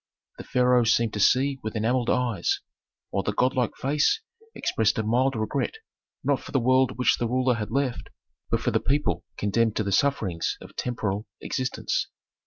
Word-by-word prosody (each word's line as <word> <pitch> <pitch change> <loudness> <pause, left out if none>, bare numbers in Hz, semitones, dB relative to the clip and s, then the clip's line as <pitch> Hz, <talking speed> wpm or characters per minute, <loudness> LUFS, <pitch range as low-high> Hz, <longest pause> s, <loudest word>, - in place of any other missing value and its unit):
The - - -6
pharaoh 125 -1 +3
seemed 115 0 +2
to 105 - -3
see 135 +6 +3
with 110 +1 -5
enamelled 120 +3 +1
eyes, 120 -8 +1 0.5
while 100 - 0
the 105 - -2
godlike 125 +1 +1
face 150 - +1 0.4
expressed 110 +2 +1
a 110 - 0
mild 125 +5 +2
regret, 110 - -1 0.5
not - - +2
for - - -11
the 135 - +2
world 130 +1 +3
which 125 - +3
the 120 - 0
ruler 130 +1 +2
had 110 -3 -4
left, 130 +1 -1 0.4
but - - +1
for - - 0
the - - +2
people 145 +3 0
condemned 110 +2 +1
to 110 - 0
the 100 - -2
sufferings 100 -9 0
of - - -13
temporal 105 -4 -2
existence. 130 -1 -2
120 Hz, 175 wpm, -26 LUFS, 110-130 Hz, 0.5 s, pharaoh